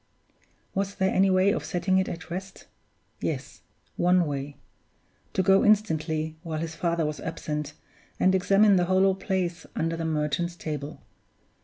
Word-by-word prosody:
Was 195 +1 -2
there 190 0 +1
any 195 +1 +4
way 185 +1 +4
of - - -2
setting 185 +1 +1
it 190 - 0
at 175 0 -7
rest? 190 +2 -6 0.5
Yes, - - -4 0.4
one 180 0 +4
way 140 -1 -4 0.8
to 190 - +1
go 195 +1 +5
instantly, 160 -7 +1
while 165 -3 -4
his 160 +1 -4
father 170 -2 0
was 150 0 -3
absent, 150 -2 -4 0.5
and 185 - +4
examine 195 +2 +4
the 175 - +2
hollow 190 +1 +3
place 185 -2 -2
under 165 +1 -1
the 165 0 -3
Merchant's 160 +2 -1
Table. 150 -2 -6
175 Hz, 150 wpm, -26 LUFS, 160-190 Hz, 0.8 s, go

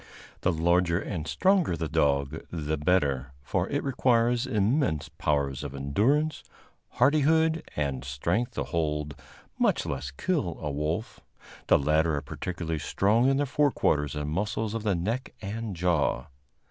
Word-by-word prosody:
The 90 - +2
larger 85 +1 +2
and 80 -6 -4
stronger 185 - +2
the 80 - -2
dog, 70 -1 +1
the 80 -2 -2
better; 70 -5 +1
for - - -1
it - - -1
requires 120 -2 +2
immense 105 - +1
powers 70 -2 -1
of 70 -2 -6
endurance, 115 - +1 0.5
hardihood 160 +2 +3
and 70 -4 -2
strength 85 - -1
to - - -1
hold, 75 -2 -2 0.5
much - - +2
less 70 0 -3
kill, 90 - -2
a 75 - -3
wolf. 75 +9 -3 0.5
The - - +6
latter 75 +2 +2
are 70 - -2
particularly 85 -3 -4
strong 110 - +2
in 135 - +2
the 145 - +1
fore 145 +2 +2
quarters 75 - 0
and 75 0 -3
muscles 105 +4 -1
of 115 - -2
the 105 -3 +1
neck 115 +10 -3
and 105 0 -5
jaw. 85 -6 0
85 Hz, 145 wpm, -27 LUFS, 75-115 Hz, 0.5 s, The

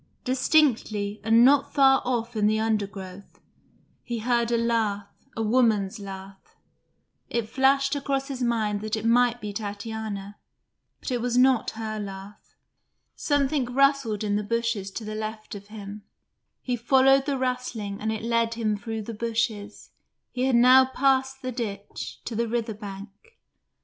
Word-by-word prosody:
Distinctly, 250 -6 +1
and 225 +2 +5
not 280 +1 +3
far 270 -1 +5
off 240 -1 -2
in 210 -1 +2
the 215 +1 +2
undergrowth, 200 -3 -4 0.6
he 240 - -4
heard 235 +1 0
a 235 - +3
laugh, 220 -4 0 0.3
a 225 - 0
woman's 215 -4 +2
laugh. 195 -1 -10 0.7
It 235 -2 -2
flashed 275 +3 +2
across 275 -1 -2
his 265 -2 -6
mind 220 -4 0
that 215 0 -2
it 220 0 -5
might 240 +1 +3
be 210 -3 -6
Tatiana, 205 -1 -6 0.6
but - - -5
it 245 -2 -1
was 245 0 0
not 255 -2 +4
her 215 -1 -4
laugh. 195 0 -9 0.6
Something 285 -2 +1
rustled 265 -4 +1
in 205 -1 0
the 210 - -2
bushes 230 -2 -1
to 215 +3 -7
the 215 - -5
left 215 0 -6
of 200 -1 -9
him; 210 -1 -9 0.6
he 250 - -1
followed 270 +3 +4
the 280 -2 0
rustling 250 -6 -3
and 220 +1 -1
it 220 0 -4
led 230 0 +1
him 220 -2 0
through 220 +1 -5
the 230 - -6
bushes 220 -2 -3 0.4
he 255 0 -1
had 265 -2 +2
now 255 +2 +7
passed 265 0 0
the 255 - -3
ditch 205 -4 -6
to 230 - -5
the 235 +1 0
river 230 -1 -2
bank. 200 -1 -8
225 Hz, 155 wpm, -25 LUFS, 210-250 Hz, 0.7 s, now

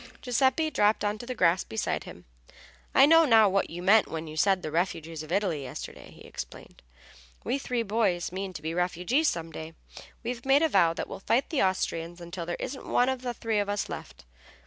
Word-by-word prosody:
Giuseppe 265 +5 +2
dropped 210 -4 +2
on 205 +1 -1
to 240 - -8
the 255 - -4
grass 180 -1 +3
beside 110 - -3
him. - - -11 0.7
"I 270 - +8
know 325 +2 +7
now 225 -7 +6
what 195 0 +1
you 175 +1 -7
meant 210 +3 +5
when 160 0 -5
you 155 -1 -8
said 185 +3 +2
the 155 - -4
refugees 165 -2 -2
of 155 +1 -10
Italy 185 -6 0
yesterday," 135 - -8
he - - -16
explained. - - -9 0.6
"We 275 - -1
three 245 -3 -2
boys 200 -6 0
mean 190 +1 -4
to 150 - -8
be 160 +1 -2
refugees 180 - +1
some 165 - -2
day. 160 +1 -8 0.5
We've 235 0 -4
made 275 +3 +4
a 320 - +3
vow 170 - +3
that - - -4
we'll - - -7
fight 235 +6 0
the 300 - +1
Austrians 175 -2 -1
until 170 0 -7
there 175 - -3
isn't 265 +1 -6
one 245 +1 +3
of 260 -1 -2
the 245 -1 -4
three 225 -2 -1
of 205 0 -1
us 205 0 -2
left. - - -8
195 Hz, 215 wpm, -28 LUFS, 170-245 Hz, 0.7 s, I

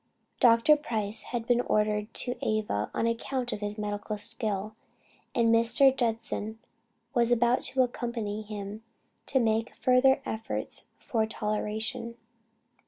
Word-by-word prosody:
Dr. 230 +5 +6
Price 220 -6 -2
had 235 -2 -3
been 245 0 +3
ordered 210 -2 0
to 245 - +1
Ava 210 - -1
on - - -1
account 245 +2 -2
of - - -4
his 205 0 -4
medical 210 0 -3
skill, 215 -1 -2 0.6
and 230 -1 +4
Mr. 240 +4 +5
Judson 225 -2 -2 0.6
was 240 0 +3
about 240 +1 +3
to 260 -1 +3
accompany 235 -4 -3
him 210 0 -7 0.5
to 270 - +2
make 225 -1 +1
a - - -24
further 255 +1 +4
effort 220 0 -4
for 220 -2 -1
toleration. 220 +3 -3
225 Hz, 130 wpm, -28 LUFS, 210-240 Hz, 0.6 s, Dr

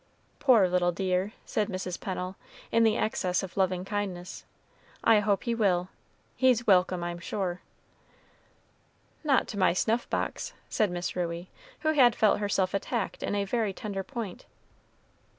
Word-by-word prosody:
"Poor 235 -9 +5
little 180 0 +2
dear," 185 +3 -1
said 210 - 0
Mrs. 185 -2 -4
Pennel, 185 0 -4 0.4
in 230 0 +4
the 220 -1 +3
excess 185 -4 0
of 190 - -7
loving 185 -1 +1
kindness, 195 -3 -4 0.6
"I 225 -2 +6
hope 205 -1 +1
he 235 - 0
will; 185 -5 +1 0.5
he's 250 -3 +3
welcome, 185 -2 +3
I'm 175 0 -4
sure." 180 0 -3 1.6
"Not 280 -4 +3
to 205 - -4
my 185 - +4
snuff 225 +6 0
box," - - -2 0.2
said 215 - +1
Miss 175 0 -3
Ruey, 175 0 -3 0.3
who 310 0 +2
had 250 -6 +5
felt 215 -2 +3
herself 195 -2 0
attacked 200 +2 -2
in - - -1
a 200 -1 0
very 215 -1 0
tender 200 -1 -4
point. 225 -6 -6
195 Hz, 150 wpm, -28 LUFS, 180-220 Hz, 1.6 s, I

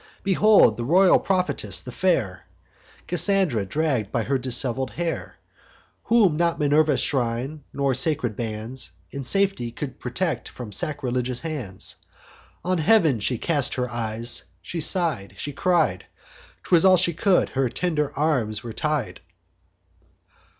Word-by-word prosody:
Behold 195 - +5
the 120 - -3
royal 180 +8 +5
prophetess, 185 -1 0
the - - -8
fair 95 - -1 0.6
Cassandra, 180 - +2
dragg'd 130 -6 -1
by 120 - 0
her 135 +2 0
dishevel'd 130 +1 -2
hair, 170 -1 -4 0.7
Whom 210 -9 +3
not 170 0 +1
Minerva's 150 -1 +2
shrine, 130 +3 -2
nor 140 -1 0
sacred 130 -4 -1
bands, 115 +3 -4 0.2
In 140 - -5
safety 190 -4 +1
could 130 +2 -7
protect 155 +7 -3
from 120 -4 -9
sacrilegious 125 - -2
hands: 135 - -4 0.7
On 185 -1 0
heav'n 160 - +3
she 115 +5 -1
cast 145 -1 0
her 125 -1 -1
eyes, 115 0 -1 0.2
she 170 - -6
sigh'd, 160 - 0
she 145 - -5
cried, 180 +4 +1 0.6
('Twas 170 -3 +4
all 190 -1 +6
she 175 0 +1
could) 185 +3 +2
her 135 -2 0
tender 150 -1 -1
arms 120 -9 0
were 115 -2 -7
tied. 150 -4 -2
140 Hz, 130 wpm, -24 LUFS, 120-170 Hz, 0.7 s, all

